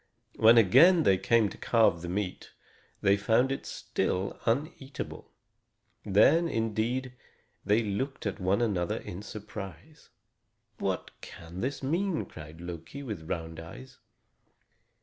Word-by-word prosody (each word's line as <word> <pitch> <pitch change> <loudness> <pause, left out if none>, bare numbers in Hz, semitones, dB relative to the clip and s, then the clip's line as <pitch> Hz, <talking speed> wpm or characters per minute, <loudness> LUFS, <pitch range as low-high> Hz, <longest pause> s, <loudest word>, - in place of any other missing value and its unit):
When 115 +2 +7
again 165 - +7
they 95 -8 +4
came 115 +2 +3
to - - -12
carve 110 -8 +3
the 85 - -5
meat, 95 0 -4 0.5
they 100 +1 +4
found 115 +6 +2
it 135 - -4
still 95 +2 -2
uneatable. 135 +2 -3 0.7
Then, 160 - +4
indeed, 115 +1 -1 0.5
they 105 +3 +2
looked 115 +7 -3
at 105 - -3
one 95 +5 +1
another 90 -6 0
in 90 - -7
surprise. 105 - -9 0.7
"What 95 -2 -2
can 85 +1 -9
this 135 +2 -3
mean?" 170 +5 0
cried 80 +1 -11
Loki, 85 - -7
with 95 - -6
round 80 -1 -4
eyes. 75 -6 -11
105 Hz, 125 wpm, -29 LUFS, 90-130 Hz, 0.7 s, When